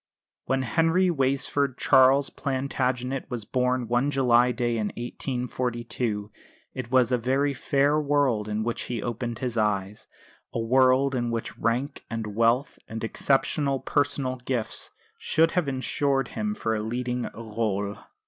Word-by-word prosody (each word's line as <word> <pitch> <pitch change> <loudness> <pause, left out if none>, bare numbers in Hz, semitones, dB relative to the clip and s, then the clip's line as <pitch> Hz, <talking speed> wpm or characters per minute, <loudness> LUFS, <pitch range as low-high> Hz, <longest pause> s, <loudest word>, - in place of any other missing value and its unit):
When 135 0 0
Henry 165 +7 +2
Weysford 135 -1 +1
Charles 135 +1 +5
Plantagenet 130 -1 -2
was 120 -5 -4
born 125 +1 0
one 120 +4 +1
July 125 -3 +4
day 120 -1 -1
in 105 -2 0
1842 120 -3 -3 0.4
it 130 -3 -5
was 130 -1 +3
a 125 - +2
very 135 +4 +1
fair 140 +2 +2
world 140 -8 +1
on 105 +1 -1
which 120 +1 -2
he 120 -4 -3
opened 120 0 -3
his 120 -3 -2
eyes, 105 -1 -1 0.5
a - - -1
world 130 +3 +3
in 120 -2 -1
which 115 -1 -3
rank 125 +6 -1
and 110 -3 -4
wealth 115 +5 +2
and 110 0 -6
exceptional 135 +3 +1
personal 140 -3 0
gifts 125 -2 -3 0.3
should 165 +1 +2
have 180 -5 0
ensured 135 0 0
for - - -14
him 210 0 -2
a 110 -1 +1
leading 125 +2 -2
rôle. 105 -2 -3
125 Hz, 140 wpm, -26 LUFS, 115-135 Hz, 0.5 s, Charles